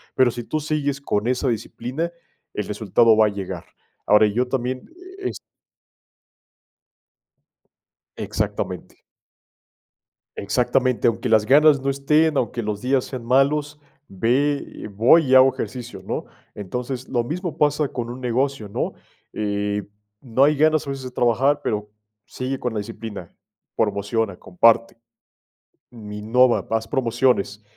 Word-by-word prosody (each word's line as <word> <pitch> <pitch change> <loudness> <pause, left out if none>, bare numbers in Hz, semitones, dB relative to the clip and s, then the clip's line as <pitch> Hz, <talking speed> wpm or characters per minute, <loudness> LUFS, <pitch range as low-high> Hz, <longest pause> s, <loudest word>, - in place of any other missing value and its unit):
pero 130 -1 +4
sí 120 +1 -6
tú 155 +6 -2
sigues 145 -2 -2
con 105 -5 -1
esa 125 +2 0
disciplina, 125 +8 -3 0.4
el 105 - -3
resultado 110 +2 +3
va 110 - +6
a - - +2
llegar. 95 -4 -6 0.4
Ahora, 105 +1 +5
yo 120 +5 0
también 130 0 -3 0.3
e 385 - -2
es. - - -7 2.8
Exactamente. - - -4 1.3
Exactamente, 125 - +1
aunque 120 +2 0
las 110 -1 +4
ganas 145 +3 +6
no 135 +1 -2
estén, 150 +3 +2
aunque 120 -1 -1
los 105 -1 -3
días 130 0 +1
sean 130 -3 -7
malos, 145 +4 +1 0.3
ve 125 +9 +1 0.3
eh, - - -5
voy 115 +11 +4
y 130 - +4
hago 130 0 +7
ejercicios, 120 -6 -6
¿no? - - -4 0.3
Entonces, 125 +6 -5
lo 120 -2 0
mismo 170 +6 -4
pasa 150 0 +2
con 120 -2 -5
un 125 +2 -7
negocio, 130 -1 -1
¿no? 100 - -3 0.4
Eh, 105 -1 -2 0.4
no 130 0 +1
hay 150 +2 +4
ganas 155 0 +3
a - - -3
veces 135 -1 -5
de 130 - -6
trabajar, 125 +4 +2
pero 105 -1 -2 0.4
sigue 130 +1 -4
con 125 - -3
la 110 - -2
disciplina, 110 -4 -7 0.5
promociona, 100 0 -1
comparte. 115 +7 +2 0.9
Mi 105 -3 -9
innova, 120 +4 +3
haz 115 0 0
promociones. 120 -5 0
125 Hz, 135 wpm, -22 LUFS, 110-135 Hz, 2.8 s, hago